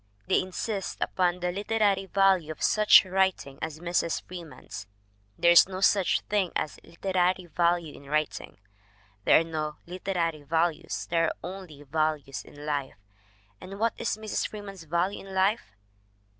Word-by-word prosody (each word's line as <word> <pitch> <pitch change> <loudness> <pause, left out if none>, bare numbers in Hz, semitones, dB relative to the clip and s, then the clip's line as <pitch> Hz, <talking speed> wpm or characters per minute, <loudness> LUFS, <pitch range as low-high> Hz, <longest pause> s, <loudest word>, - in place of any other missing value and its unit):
They - - +3
insist 195 +2 -4
upon 180 -1 0
the 180 0 0
literary 200 0 +1
value 190 -5 +3
of 155 - -7
such 215 -1 +6
writing 185 -7 0
as 160 -1 -4
Mrs. 170 -1 -1
Freeman's. 165 - -9 0.5
There 170 - +5
is 175 - +8
no 185 -1 -5
such 195 -2 +3
thing 200 -4 0
as 155 - -2
literary 185 +1 0
value 170 -1 0
in 140 - -13
writing. 155 +1 -2 0.7
There - - +7
are - - 0
no 155 -2 -4
literary 175 -3 -2
values, 160 +2 -1
there 165 -1 +3
are - - -1
only 180 -6 -8
values 145 -5 -1
in 145 0 -12
life. 145 -3 -2 0.7
And 195 +2 -8
what 225 +2 +1
is - - -1
Mrs. 215 -1 -2
Freeman's 200 -5 -9
value 170 +5 0
in 190 - -8
life? 190 - +1
175 Hz, 150 wpm, -27 LUFS, 155-195 Hz, 0.7 s, is